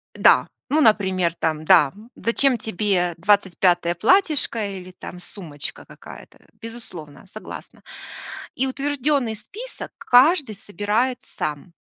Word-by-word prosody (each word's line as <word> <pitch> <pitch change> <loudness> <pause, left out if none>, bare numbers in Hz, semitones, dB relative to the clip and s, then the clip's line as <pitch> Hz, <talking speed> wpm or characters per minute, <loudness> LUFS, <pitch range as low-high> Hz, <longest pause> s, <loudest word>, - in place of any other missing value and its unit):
Да, - - +5 0.2
ну, 300 +4 +2
например, 190 - +2
там, 155 -2 -2
да, 155 -6 +6 0.2
зачем 250 +2 +1
тебе 195 -5 -1
25 180 -2 +2
платьишко 260 - +2
или 185 0 -10
там 180 0 -10
сумочка 175 -5 -8
какая-то? - - -14 0.2
Безусловно, 225 -10 -10
согласна. - - -11 0.7
И 265 - 0
утвержденный 275 -3 -1
список 455 - -10
каждый 265 -1 +4
собирает 210 +6 -1
сам. 150 +4 -6
210 Hz, 105 wpm, -22 LUFS, 175-255 Hz, 0.7 s, да